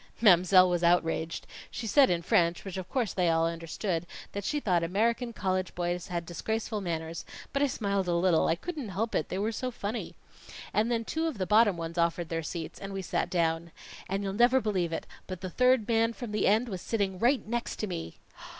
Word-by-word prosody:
"Mam'selle 185 -3 +6
was 175 -1 0
outraged. 165 -1 +1 0.2
She 225 - -6
said 270 +5 +5
in 170 -1 0
French, 170 +1 +2
which 195 - -6
of 185 -1 -6
course 240 -7 -1
they 180 -2 +2
all 165 0 +3
understood, 165 +1 -3 0.2
that 200 - -4
she 295 +8 -1
thought 180 -10 +1
American 230 +7 0
college 185 -4 -2
boys 175 +1 -2
had 170 -2 -3
disgraceful 220 +5 -3
manners; 165 -2 -4 0.3
but 275 - +1
I 285 - +4
smiled 200 -6 -1
a 175 - +1
little 170 -1 +3
I 165 - +2
couldn't 295 - -5
help 220 +5 -2
it, - - 0
they 185 - -3
were 210 +3 0
so 255 +3 -3
funny. 225 -1 -5 0.6
And 215 +3 +2
then 230 -1 0
two 320 +6 -1
of 310 -8 -3
the 185 - -1
bottom 210 -1 +4
ones 165 +1 -4
offered 170 0 0
their 165 0 -1
seats, 160 0 -6
and 195 0 -6
we 195 0 -4
sat - - -1
down. 165 -1 0 0.4
And 195 +1 -1
you'll 195 -1 -2
never 240 +5 +5
believe 190 -7 -1
it, - - -3 0.2
but 185 -2 -6
the 185 -2 -5
third 250 0 +3
man 230 0 +2
from 235 -2 -7
the 210 - +1
end 220 +5 +3
was 190 -5 -5
sitting 195 -5 -1
right 245 +5 +2
next 240 +1 -2
to - - -3
me!" 80 - -6
190 Hz, 215 wpm, -29 LUFS, 170-225 Hz, 0.6 s, Mam'selle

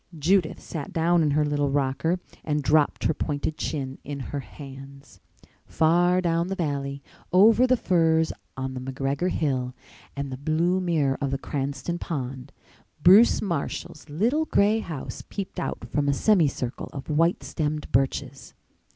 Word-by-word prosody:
Judith 170 +2 +2
sat 160 +1 -6
down 170 -1 +2
in 155 - +2
her 150 +1 +2
little 145 -1 0
rocker 140 +5 0 0.2
and 150 -1 -1
dropped 150 0 +2
her - - +2
pointed 150 +1 -2
chin 135 -4 -4
in 145 -1 -6
her 145 - -1
hands. 135 0 -11 0.5
Far 175 +3 +3
down 170 -1 +1
the 195 - -2
valley, 140 -4 -3 0.3
over 220 +7 +6
the 255 0 +3
firs 160 -5 +2 0.2
on 130 0 -3
the 130 - -5
McGregor 135 +6 -2
hill 130 -7 -1 0.4
and 140 -1 -4
the 130 - -5
blue 165 +6 +1
mirror 155 -7 +1
of 140 - 0
the 135 - -1
Cranston 140 +5 -3
pond, 130 -4 -5 0.5
Bruce 200 +7 +7
Marshall's 160 -4 -4
little 235 - +1
gray 210 -4 +3
house 160 -10 -6
peeped 195 -2 -5
out - - -4
from 145 -1 +1
a - - +3
semicircle 145 - +1
of 135 - -7
white 165 +4 +2
stemmed 150 -1 -3
birches. 135 +1 -1
150 Hz, 150 wpm, -25 LUFS, 140-175 Hz, 0.5 s, Bruce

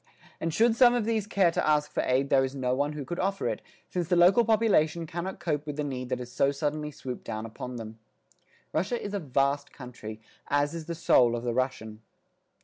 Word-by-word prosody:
And 165 - -1
should 225 +7 +3
some 245 0 +6
of 235 -3 0
these 220 -2 0
care 195 -4 +3
to - - -1
ask 150 -1 +2
for - - 0
aid 135 +2 +1
there 135 -1 +5
is 135 +1 -3
no 125 -2 0
one 145 +3 0
who 145 -2 -5
could 175 +6 -5
offer 195 +1 0
it, - - -2 0.3
since 175 -3 -2
the 180 - +2
local 180 +7 +6
population 200 -8 +2
cannot 175 +4 -5
cope 155 -3 -2
with 150 - -4
the 150 - -1
need 130 -3 -4
that 130 - 0
has 125 -1 -8
so 140 - +2
suddenly 150 +1 -2
swooped 130 -4 -7
down 110 +1 -5
upon 125 +3 -7
them. 110 -1 -8 0.7
Russia 200 +9 0
is 205 - -6
a 205 - 0
vast 140 -1 0
country, 120 -4 -9 0.3
as 145 +1 +1
is 165 -2 -6
the 170 - -3
soul 120 -7 +4
of 120 - -4
the 120 -1 -1
Russian. 115 -4 -2
150 Hz, 225 wpm, -28 LUFS, 130-175 Hz, 0.7 s, some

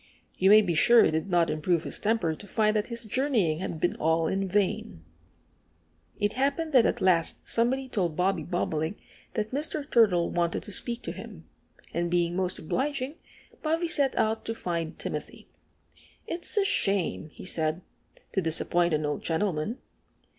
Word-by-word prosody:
You 190 - +3
may 215 +1 +8
be 175 -4 0
sure 235 +9 +6
it - - +2
did 160 +4 -2
not 175 -2 +2
improve 160 +2 0
his - - -3
temper 210 -7 +1
to 205 +6 -10
find 215 +2 +1
that 210 0 0
his 235 -1 -5
journeying 215 - +1
had 170 -3 -4
been 175 - 0
all 160 +1 +1
in 195 +3 -1
vain. 190 - -1 1.2
It 205 0 0
happened 285 +4 -1
that 250 -4 +6
at - - -2
last 175 -3 +1
somebody 260 +3 +2
told 180 -10 -1
Bobby 180 0 +1
Bobolink 160 +1 -2 0.4
that 215 -1 -2
Mr. 290 +1 -3
Turtle 200 - +3
wanted 170 -1 -1
to 210 - -9
speak 235 +4 -3
to - - -4
him. - - -10 0.5
And 170 0 -1
being 175 0 +1
most 185 -1 -1
obliging, 275 - -2 0.5
Bobby 325 +2 0
set 285 -4 +2
out 220 +1 +1
to 225 - -3
find 170 -5 -3
Timothy. - - -6 0.8
"It's 345 +5 +2
a 405 - +4
shame," 195 - +1
he - - -12
said, 160 -1 -1 0.5
"to 190 - 0
disappoint 170 0 +1
an 150 0 -1
old 150 0 -2
gentleman." 175 +4 -1
190 Hz, 170 wpm, -27 LUFS, 170-235 Hz, 1.2 s, may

